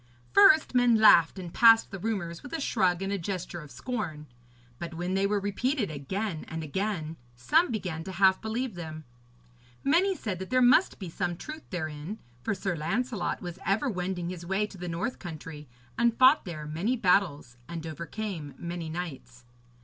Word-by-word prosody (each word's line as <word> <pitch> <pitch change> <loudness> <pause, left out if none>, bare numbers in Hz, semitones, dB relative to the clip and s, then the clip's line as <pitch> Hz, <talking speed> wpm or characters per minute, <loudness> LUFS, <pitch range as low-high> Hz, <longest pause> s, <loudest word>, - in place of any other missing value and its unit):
First, 390 -8 +6
men 245 -2 +5
laughed 200 -6 +6
and 175 -3 -7
passed 225 -1 +6
the 195 - -6
rumours 175 -5 -3
with 285 - -10
a 325 - -1
shrug 190 - +1
and 195 +1 -2
a 200 - -1
gesture 175 -1 -4
of 150 - -12
scorn; 175 - -4 0.5
but 170 -1 -6
when 175 +2 -2
they 195 +1 +2
were 205 0 +1
repeated 205 - -1
again 160 +5 -3
and 160 0 -5
again, 165 0 -3 0.2
some 310 - +3
began 180 -8 -3
half 190 +1 +3
to - - -28
believe 225 +2 -2
them. 160 -3 -7 0.8
Many 360 +7 +3
said 205 - -4
that 190 - -6
there 255 +1 +3
must 255 +8 +5
be 190 - -6
some 175 +1 -3
truth 310 - -9
therein, 155 +2 -5 0.2
for 215 - -1
Sir 190 -1 -2
Lancelot 195 +6 -2
was 175 -1 -6
ever 220 +7 +1
wending 180 -2 -3
his 175 -2 -7
way 195 +4 0
to 205 -2 -11
the 175 0 -5
north 170 +9 -3
country, 155 -3 -8 0.3
and 235 -1 +3
fought 260 +4 +6
there 155 -4 -6
many 170 +11 -1
battles 175 - +1
and 165 -1 -5
overcame 165 -1 -5
many 170 -1 -5
knights. 155 -7 -7
185 Hz, 180 wpm, -28 LUFS, 165-220 Hz, 0.8 s, First